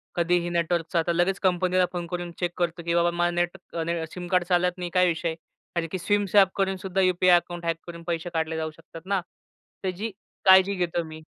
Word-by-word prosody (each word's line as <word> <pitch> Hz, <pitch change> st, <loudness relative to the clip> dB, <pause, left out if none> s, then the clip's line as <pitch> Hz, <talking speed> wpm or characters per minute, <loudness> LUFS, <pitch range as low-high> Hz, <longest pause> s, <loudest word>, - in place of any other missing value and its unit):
कधीही 175 Hz, 0 st, +1 dB
नेटवर्कचा, 170 Hz, 0 st, 0 dB
तर 170 Hz, -, +2 dB
लगेच 180 Hz, +3 st, +1 dB
कंपनीला 185 Hz, 0 st, +2 dB
फोन 175 Hz, -1 st, -4 dB
करून 175 Hz, 0 st, -4 dB
चेक 175 Hz, -1 st, 0 dB
करतो 170 Hz, -1 st, -1 dB
की 170 Hz, -, 0 dB
बाबा, 170 Hz, 0 st, +3 dB
माझा 175 Hz, 0 st, +1 dB
नेटने 170 Hz, -2 st, -2 dB
सिम 180 Hz, -1 st, -7 dB
कार्ड 180 Hz, -1 st, +2 dB
चालत 180 Hz, 0 st, +1 dB
नाही, 175 Hz, -1 st, -4 dB
काय 180 Hz, 0 st, +4 dB
विषय? 165 Hz, -1 st, -1 dB, 0.4 s
कारण 170 Hz, -1 st, 0 dB
की 185 Hz, -, -2 dB
सिम 205 Hz, +3 st, +1 dB
स्वॅप 195 Hz, -1 st, +5 dB
करून 195 Hz, -1 st, 0 dB
सुद्धा 190 Hz, 0 st, -1 dB
यु-पी-आय 185 Hz, -1 st, +5 dB
अकाउंट 175 Hz, 0 st, -5 dB
हॅक 165 Hz, -1 st, 0 dB
करून 170 Hz, -1 st, -8 dB
पैसे 170 Hz, 0 st, -2 dB
काढले 160 Hz, 0 st, -1 dB
जाऊ 160 Hz, -1 st, -3 dB
शकतात 165 Hz, +1 st, -13 dB
ना. 195 Hz, -1 st, 0 dB, 0.6 s
त्याची 195 Hz, +4 st, -3 dB, 0.3 s
काळजी 190 Hz, +1 st, +7 dB
घेतो 175 Hz, -2 st, -1 dB
मी. 155 Hz, 0 st, -10 dB
175 Hz, 200 wpm, -26 LUFS, 170-185 Hz, 0.6 s, काळजी